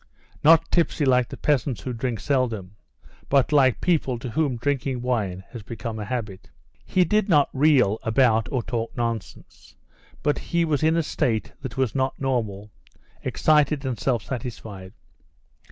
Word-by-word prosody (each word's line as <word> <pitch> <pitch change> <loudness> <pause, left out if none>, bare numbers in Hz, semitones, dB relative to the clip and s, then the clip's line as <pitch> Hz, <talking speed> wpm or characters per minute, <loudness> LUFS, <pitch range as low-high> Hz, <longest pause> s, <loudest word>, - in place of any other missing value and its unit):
Not 165 +2 +5
tipsy 165 -3 +1
like 125 -2 +3
the - - -8
peasants 140 -4 0
who 130 - -4
drink 115 -1 -3
seldom, 115 -9 -1 0.5
but 140 0 +3
like 135 -4 +4
people 150 -8 +1
to 115 +1 -6
whom 145 -2 0
drinking 130 -1 -2
wine 100 -7 -1
has 120 - -8
become 115 +1 -6
a 105 - -4
habit. 105 -6 -5 0.3
He 185 -1 +2
did 210 +4 +1
not 145 -5 +4
reel 130 -7 +3
about 115 -1 +2
or 130 -4 -1
talk 115 -1 -4
nonsense, 115 -3 -5 0.5
but 145 0 +1
he 170 0 0
was 150 -3 0
in 160 +1 +3
a 165 - +2
state 120 -8 -1
that 130 -2 -7
was 130 -5 0
not 130 0 -1
normal; 110 -6 -2 0.5
excited 150 -2 +2
and 125 -4 -3
self 120 -5 0
satisfied. 110 -6 -7
125 Hz, 155 wpm, -24 LUFS, 115-145 Hz, 0.5 s, Not